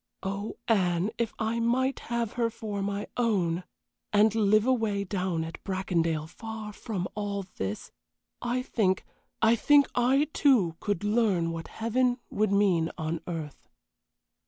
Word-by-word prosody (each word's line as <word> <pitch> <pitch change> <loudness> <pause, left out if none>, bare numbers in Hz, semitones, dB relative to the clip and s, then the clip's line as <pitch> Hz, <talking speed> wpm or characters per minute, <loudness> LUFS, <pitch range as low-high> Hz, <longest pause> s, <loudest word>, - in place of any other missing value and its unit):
Oh, 200 +2 -4
Anne, 185 -2 +2
if 235 -2 0
I 225 +1 -1
might 255 +3 +1
have 235 -2 -1
her 235 -1 0
for 215 -3 -5
my 200 +1 -2
own, 185 -8 +1 0.5
and 210 +1 +5
live 215 0 +4
away 225 -6 +1
down 180 -4 -1
at 165 0 -8
Bracondale 170 -5 0
far 220 +4 -7
from 195 -4 -4
all 200 -1 -3
this, 95 +2 -4 0.5
I 245 +1 -1
think 190 -7 +1 0.4
I 225 +1 +6
think 285 +4 +5
I, 265 +5 +3
too, 215 - +4
could 205 -2 -2
learn 205 -6 +2
what 165 0 -5
heaven 245 +2 +1
would 210 -1 +1
mean 190 -5 +3
on 160 0 -2
earth." 150 - -6
205 Hz, 140 wpm, -28 LUFS, 180-230 Hz, 0.5 s, I